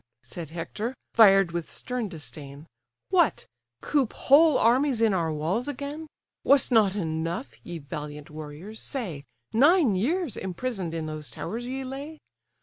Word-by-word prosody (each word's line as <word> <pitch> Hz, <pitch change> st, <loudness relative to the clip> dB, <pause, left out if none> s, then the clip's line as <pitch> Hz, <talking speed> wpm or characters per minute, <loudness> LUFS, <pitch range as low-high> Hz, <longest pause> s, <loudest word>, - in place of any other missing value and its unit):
(said 170 Hz, -4 st, -8 dB
Hector, 210 Hz, +9 st, -4 dB, 0.2 s
fired 195 Hz, -5 st, +6 dB
with 170 Hz, -1 st, -4 dB
stern 250 Hz, -4 st, -4 dB
disdain) 145 Hz, -2 st, -8 dB, 0.4 s
What! 350 Hz, -5 st, +2 dB, 0.4 s
coop 275 Hz, -6 st, +1 dB
whole 300 Hz, +1 st, +5 dB
armies 250 Hz, +2 st, +3 dB
in 225 Hz, -3 st, +3 dB
our 165 Hz, -3 st, 0 dB
walls 165 Hz, -, -1 dB
again? 290 Hz, +3 st, -5 dB, 0.4 s
Was't 280 Hz, -1 st, +4 dB
not 210 Hz, -5 st, +4 dB
enough, 160 Hz, -, -3 dB
ye 175 Hz, -, -6 dB
valiant 150 Hz, 0 st, -7 dB
warriors, 155 Hz, +8 st, -8 dB
say, 180 Hz, -, -4 dB, 0.3 s
Nine 285 Hz, -, +5 dB
years 295 Hz, -, 0 dB
imprison'd 190 Hz, -2 st, -3 dB
in 160 Hz, -1 st, -3 dB
those 155 Hz, -1 st, -6 dB
towers 240 Hz, +3 st, -5 dB
ye 265 Hz, +1 st, -4 dB
lay? 280 Hz, +4 st, -7 dB
205 Hz, 140 wpm, -26 LUFS, 160-265 Hz, 0.4 s, fired